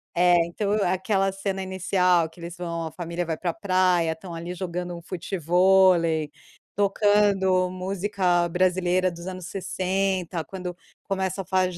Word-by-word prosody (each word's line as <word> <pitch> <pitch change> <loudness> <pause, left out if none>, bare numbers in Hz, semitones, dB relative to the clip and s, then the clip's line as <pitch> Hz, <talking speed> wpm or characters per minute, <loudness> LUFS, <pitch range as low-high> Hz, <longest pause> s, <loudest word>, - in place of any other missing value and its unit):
é, 175 0 +5
então 200 +4 -3
aquela 195 +2 +1
cena 195 0 -3
inicial 180 -2 +1
que 165 - -19
eles 170 0 -7
vão, 170 -2 -4
a 160 - -6
família 170 +1 -4
vai 160 -1 -2
para 175 +2 -3
a - - -1
praia, 185 -5 +2
estão 170 +2 -8
ali 170 +2 -5
jogando 180 0 -4
um 170 - -9
futevôlei 175 -2 +2 0.4
tocando 200 -2 +3
música 185 -1 0
brasileira 185 +1 +1
dos 170 +1 -9
anos 185 -2 -6
60, 185 -2 -2
quando 180 +1 -6 0.3
começa 190 -1 -2
a - - -22
fa 185 +1 +2
185 Hz, 150 wpm, -25 LUFS, 175-190 Hz, 0.4 s, é